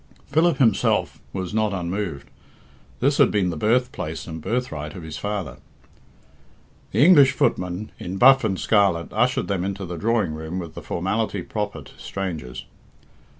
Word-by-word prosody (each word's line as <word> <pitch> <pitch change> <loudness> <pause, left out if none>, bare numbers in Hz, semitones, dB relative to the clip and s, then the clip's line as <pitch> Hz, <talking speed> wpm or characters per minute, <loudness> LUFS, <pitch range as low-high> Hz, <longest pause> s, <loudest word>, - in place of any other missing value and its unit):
Philip 160 0 +2
himself 115 -6 +2
was 95 0 -4
not 110 -1 +1
unmoved. 90 -5 -4 0.7
This 140 +3 +2
had 140 - +6
been 95 -4 +1
the - - -4
birthplace 105 - -1
and 80 -1 -7
birthright 75 -10 -3
of 90 - -8
his 80 -1 -7
father. 100 -10 -4 1.3
The 140 - +4
English 145 -7 +7
footman, 90 -4 -1
in 95 +2 -5
buff 135 +4 +7
and 95 -4 -1
scarlet, 100 -6 +2
ushered 125 +4 +1
them 95 -3 -1
into 100 0 -3
the 90 0 -6
drawing 110 -3 +1
room 80 +3 -5
with 85 -4 -6
the - - -8
formality - - -2
proper - - -4
to - - -17
strangers. 80 -10 -5
95 Hz, 150 wpm, -23 LUFS, 85-115 Hz, 1.3 s, English